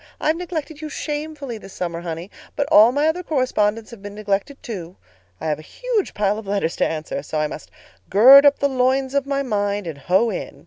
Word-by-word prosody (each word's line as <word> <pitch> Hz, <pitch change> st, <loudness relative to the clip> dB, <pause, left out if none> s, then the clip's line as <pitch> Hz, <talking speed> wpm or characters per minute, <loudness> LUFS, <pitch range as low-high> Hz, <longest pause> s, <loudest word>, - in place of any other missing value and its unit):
I've 310 Hz, +1 st, +1 dB
neglected 325 Hz, -3 st, -5 dB
you 310 Hz, -, -5 dB
shamefully 295 Hz, -5 st, -5 dB
this 195 Hz, -, -12 dB
summer, 170 Hz, -2 st, -4 dB
honey, 170 Hz, +2 st, -6 dB, 0.2 s
but 285 Hz, -, -1 dB
all 220 Hz, +3 st, +8 dB
my 290 Hz, +4 st, +1 dB
other 330 Hz, +3 st, 0 dB
correspondents 230 Hz, -9 st, 0 dB
have 230 Hz, -4 st, -11 dB
been 205 Hz, 0 st, -8 dB
neglected, 210 Hz, +6 st, -2 dB
too. 185 Hz, -6 st, -7 dB, 0.4 s
I -, -, -7 dB
have 150 Hz, -1 st, -1 dB
a -, -, -9 dB
huge 460 Hz, -, -3 dB
pile 205 Hz, +1 st, 0 dB
of 215 Hz, -, -11 dB
letters 195 Hz, -5 st, -1 dB
to -, -, +2 dB
answer, 155 Hz, -3 st, -4 dB
so 150 Hz, +2 st, -5 dB
I 155 Hz, -, +1 dB
must 150 Hz, -, -7 dB, 0.4 s
gird 260 Hz, +8 st, +9 dB
up 285 Hz, -1 st, +5 dB
the 280 Hz, -, +1 dB
loins 265 Hz, 0 st, +1 dB
of 280 Hz, -1 st, 0 dB
my 280 Hz, 0 st, 0 dB
mind 205 Hz, -4 st, -1 dB
and 160 Hz, -4 st, -6 dB
hoe 190 Hz, +10 st, +2 dB
in. 185 Hz, -, -6 dB
225 Hz, 215 wpm, -21 LUFS, 195-280 Hz, 0.4 s, gird